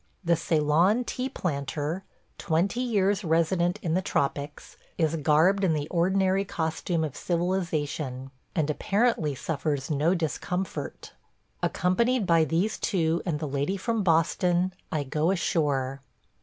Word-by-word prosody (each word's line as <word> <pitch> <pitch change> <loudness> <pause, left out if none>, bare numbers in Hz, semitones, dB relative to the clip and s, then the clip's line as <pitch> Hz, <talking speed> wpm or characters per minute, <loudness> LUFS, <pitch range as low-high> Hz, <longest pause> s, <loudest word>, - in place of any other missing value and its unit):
The 170 0 +4
Ceylon 165 +7 +2
tea 255 +2 -3
planter, 150 - -3 0.4
twenty 175 +8 0
years 205 -5 +1
resident 170 +2 +1
in 165 -3 0
the 185 - +2
tropics, 145 -3 -2 0.2
is 160 -1 +1
garbed 160 +7 +3
in 175 -4 +3
the 150 -1 -2
ordinary 190 +2 +2
costume 165 -2 -2
of 150 -4 -4
civilization, 155 -7 -2 0.2
and 155 -3 +1
apparently 195 - +1
suffers 145 0 -2
no 155 +5 +2
discomfort. 180 +3 -4 0.5
Accompanied 230 +6 +1
by 165 -2 +4
these 170 +8 0
two 165 -4 +1
and 160 -4 0
the 155 - -3
lady 145 +8 -1
from 230 +2 -1
Boston, 175 +1 +2 0.2
I 150 -2 0
go 150 +4 0
ashore. 140 -7 0
170 Hz, 130 wpm, -27 LUFS, 150-190 Hz, 0.5 s, The